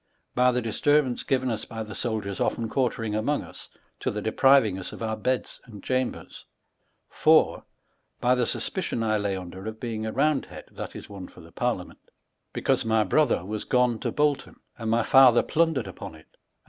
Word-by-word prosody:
By 125 +1 +4
the 125 -1 -1
disturbance 130 +3 +1
given 130 -1 0
lis 110 -2 -3
by 110 -1 -6
the 110 0 -9
soldiers 110 -5 -2
otlou 115 - 0
quarteriog 115 -4 -1
among 140 +8 0
us, - - -13 0.3
to - - -1
the 105 - -3
depriving 110 -1 +3
us 90 - -6
of - - -7
our 110 -1 -1
beda 125 +4 -1 0.2
and 105 -5 -12
chambers: 130 -1 -3 0.7
IV, - - +4 0.6
By 125 +1 +3
the 125 -2 +1
suspicion 170 - -2
I 110 -1 +1
lay 100 -1 -1
under 95 +2 -8
of 110 0 -6
being 110 -2 -4
a - - -2
round 145 +2 +1
bead, - - -9
{that - - -7
ia, - - -7
oue 100 -3 -9
for - - -15
the 80 - -15
Parliament,) 115 -2 -3 0.5
because - - 0
my 110 -1 +2
brother 105 - +2
was 105 +1 -4
gone 125 -3 +2
to - - -2
Bolton, 150 -1 0 0.2
and 115 -2 -4
my 115 +1 +2
father 130 -2 +6
plundered 160 -6 +1
upon - - -8
it, 80 - -16
and - - -36
115 Hz, 190 wpm, -26 LUFS, 110-130 Hz, 0.7 s, father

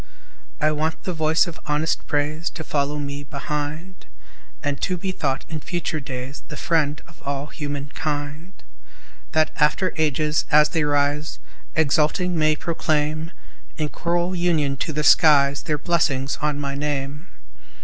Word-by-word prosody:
I 155 +1 +3
want 155 +1 -1
the 185 - -2
voice 160 +1 +3
of 170 -3 -8
honest 150 +2 0
praise 150 +3 0
To 160 - -7
follow 145 -1 0
me 140 0 -4
behind, 150 +5 -5 0.6
And 145 -1 -1
to 185 -1 0
be 190 +2 -2
thought 135 -6 -1
in 160 -2 -4
future 170 -1 -2
days 135 -1 -6
The 150 - -7
friend 150 -3 +1
of 140 +1 -5
human 145 -1 -4
kind, 150 +4 -3 0.8
That 155 -1 +3
after 160 +4 +2
ages, 150 0 +1
as 150 0 +6
they 160 -3 +1
rise, 145 +1 +1 0.4
Exulting 160 +4 +2
may 155 -1 +3
proclaim 155 -1 -1 0.5
In 155 -2 -1
choral 175 +3 0
union 160 -6 +1
to 155 - -2
the 150 0 -1
skies 140 -3 +6
Their 150 -2 -1
blessings 145 -4 +1
on 150 -1 0
my 140 -1 -2
name. 145 +2 -3
150 Hz, 145 wpm, -23 LUFS, 145-160 Hz, 0.8 s, as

